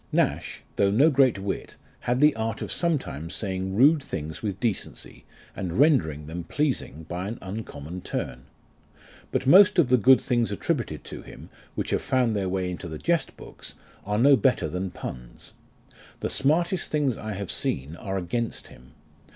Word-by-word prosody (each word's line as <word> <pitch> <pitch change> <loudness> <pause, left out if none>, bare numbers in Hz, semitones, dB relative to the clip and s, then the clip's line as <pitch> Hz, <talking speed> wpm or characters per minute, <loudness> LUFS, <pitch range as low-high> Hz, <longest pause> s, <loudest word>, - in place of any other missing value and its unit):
Nash, - - 0
though 100 - +4
no 135 +11 +5
great 130 -5 +4
wit, 95 0 -4 0.2
had 120 +1 0
the 150 0 +5
art 110 0 -2
of - - -5
sometimes 95 - -1
saying 95 -2 -3
rude 145 +6 +5
things 80 - -5
with 100 -3 -3
decency, 115 -6 -4 0.3
and 90 -3 -3
rendering 85 - +3
them 85 +3 -5
pleasing 125 - -2
by 90 +4 -4
an 115 +3 -5
uncommon 90 -4 -7
turn. 60 -5 -4 0.9
But - - -1
most 190 +8 +7
of 160 -8 +4
the 125 - +6
good 130 +4 +7
things 120 -3 0
attributed 110 - -2
to - - -8
him, - - -12 0.2
which - - -3
have - - +1
found 125 -4 +1
their 95 -2 -1
way 90 -1 -1
into 90 0 -6
the 80 -1 -6
jest 170 - 0
books, - - -10 0.3
are 105 +1 -1
no 140 +5 +7
better 130 +1 +2
than 95 +1 -3
puns. - - -9 0.7
The - - -1
smartest 170 +6 +1
things 145 -5 +1
I 110 0 -5
have 100 -1 -4
seen 70 +5 -2
are 95 +2 -4
against 110 +6 -3
him. 65 +1 -17
105 Hz, 170 wpm, -26 LUFS, 90-135 Hz, 0.9 s, most